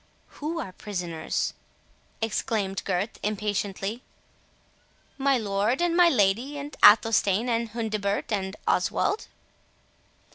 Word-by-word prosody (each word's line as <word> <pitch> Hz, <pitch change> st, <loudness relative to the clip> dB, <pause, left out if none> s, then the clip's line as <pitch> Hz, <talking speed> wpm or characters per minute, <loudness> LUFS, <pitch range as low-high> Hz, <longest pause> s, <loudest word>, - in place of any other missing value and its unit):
"Who 320 Hz, +3 st, -2 dB
are 190 Hz, -, -5 dB
prisoners?" 180 Hz, -5 st, -3 dB, 0.7 s
exclaimed 210 Hz, -3 st, -1 dB
Gurth, 195 Hz, +3 st, -2 dB
impatiently. 205 Hz, +1 st, -2 dB, 1.2 s
"My 275 Hz, 0 st, +3 dB
lord, 210 Hz, +3 st, 0 dB
and 345 Hz, -1 st, +1 dB
my 350 Hz, -1 st, +6 dB
lady, 240 Hz, +4 st, +1 dB
and 285 Hz, +1 st, -7 dB
Athelstane, 210 Hz, 0 st, +5 dB
and 230 Hz, -1 st, 0 dB
Hundibert, 215 Hz, -2 st, -2 dB
and 195 Hz, -1 st, -2 dB
Oswald." 420 Hz, -, +1 dB
215 Hz, 100 wpm, -26 LUFS, 195-250 Hz, 1.2 s, my